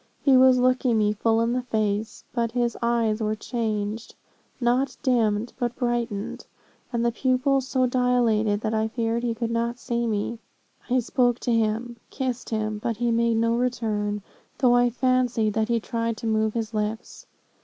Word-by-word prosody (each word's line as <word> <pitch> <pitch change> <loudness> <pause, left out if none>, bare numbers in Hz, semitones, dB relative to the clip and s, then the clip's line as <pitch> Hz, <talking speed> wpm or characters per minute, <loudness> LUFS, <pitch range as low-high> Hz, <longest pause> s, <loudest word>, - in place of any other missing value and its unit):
He 275 -2 +5
was 255 0 +6
looking 250 -1 +2
me 210 -1 +2
full 225 +2 +1
in 230 +1 +1
the 250 - 0
face, 215 -3 -2
but 235 -2 -1
his 240 -1 0
eyes 230 -2 +1
were 215 0 0
changed, 215 -1 -3 0.4
not 255 +2 +1
dimmed, 230 -4 +1
but 240 -1 -1
brightened, 240 -5 -2 0.4
and 235 -1 0
the 235 - +2
pupils 260 +2 +1
so 260 -1 +2
dilated, 240 -4 +2
that 220 0 -2
I 220 0 +1
feared 230 0 -1
he 235 -1 -1
could 230 0 -3
not 235 +1 -1
see 235 -1 -2
me. 220 +1 -2 0.5
I 255 +1 +3
spoke 245 0 +1
to 245 - -1
him 230 +2 0
kissed 255 -2 -3
him 215 -1 -2
but 230 0 -2
he 240 0 0
made 230 0 +2
no 230 +1 +2
return, 215 -4 -1 0.3
though 250 -2 +4
I 245 0 +4
fancied 250 -3 +1
that 220 +1 0
he 235 -1 +2
tried 230 0 -2
to - - -7
move 220 0 +1
his 225 -1 -3
lips. 215 +2 -4
235 Hz, 175 wpm, -25 LUFS, 220-245 Hz, 0.5 s, was